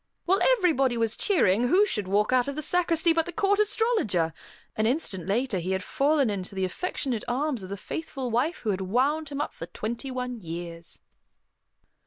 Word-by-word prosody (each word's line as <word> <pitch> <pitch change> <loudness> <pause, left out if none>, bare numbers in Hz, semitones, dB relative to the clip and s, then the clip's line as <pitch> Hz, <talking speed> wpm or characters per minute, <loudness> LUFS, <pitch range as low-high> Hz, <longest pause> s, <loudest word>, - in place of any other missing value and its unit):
While 385 +2 +2 0.2
everybody 275 - +2
was 225 -1 0
cheering, 245 - +3
who 380 +10 +5
should 210 - -3
walk 205 +5 +2
out 255 0 +3
of 280 - -3
the 305 - -4
sacristy 335 -1 +2
but 330 -1 +1
the - - -4
Court 405 +2 +1
Astrologer! 415 - +1 0.4
An 215 0 +1
instant 205 - -1
later, 225 0 0
he 185 +2 -2
had 190 0 -2
fallen 280 +3 +2
into 195 -1 -5
the 190 -1 0
affectionate 245 - -3
arms 260 0 -1
of 185 - -8
the 200 - -4
faithful 270 - -5
wife 255 +9 0
who 215 - 0
had 190 -1 -2
wound 275 +10 +1
him 285 -1 -5
up 295 - -2
for 165 - -8
twenty 235 +8 -5
one 250 -2 -4
years. 170 0 -7
250 Hz, 190 wpm, -27 LUFS, 195-315 Hz, 0.4 s, who